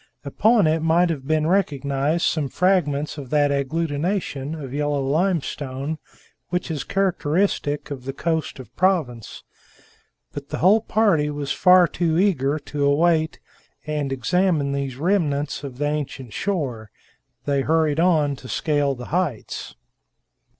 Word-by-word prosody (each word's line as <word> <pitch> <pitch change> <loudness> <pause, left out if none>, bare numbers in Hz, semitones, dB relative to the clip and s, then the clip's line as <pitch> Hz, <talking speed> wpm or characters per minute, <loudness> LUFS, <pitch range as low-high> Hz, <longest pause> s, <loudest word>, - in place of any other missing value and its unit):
Upon 215 - +3
it 155 +1 +2
might 170 +2 +3
have 135 -4 -5
been 155 0 +1
recognized 150 -3 0
some 150 -3 0
fragments 155 -5 +1
of 135 -3 -8
that 145 -1 +2
agglutination 150 +1 -2
of 135 -3 -7
yellow 145 0 0
limestone 150 -3 -1 0.5
which 180 -1 -2
is 145 -4 -3
characteristic 175 -4 0
of 130 -3 -6
the 135 - -3
coast 160 +2 -2
of 125 -3 -12
Provence. 155 - -1 0.9
But 145 0 -7
the - - -3
whole 200 +6 +4
party 205 -10 +2
was 145 -1 -4
far 180 -1 +6
too 165 +1 0
eager 155 -7 +2
to 145 -1 -1
wait 160 +2 +2 0.5
and 150 -3 -2
examine 145 - +1
these 140 -2 -3
remnants 150 -5 0
of 135 -3 -7
the 145 - -1
ancient 145 -5 -4
shore; 135 - -3 0.6
they 140 -1 +1
hurried 155 0 +1
on 155 -5 +3
to 130 - -11
scale 145 -3 0
the 125 -1 -8
heights. 170 - -2
150 Hz, 135 wpm, -22 LUFS, 140-170 Hz, 0.9 s, far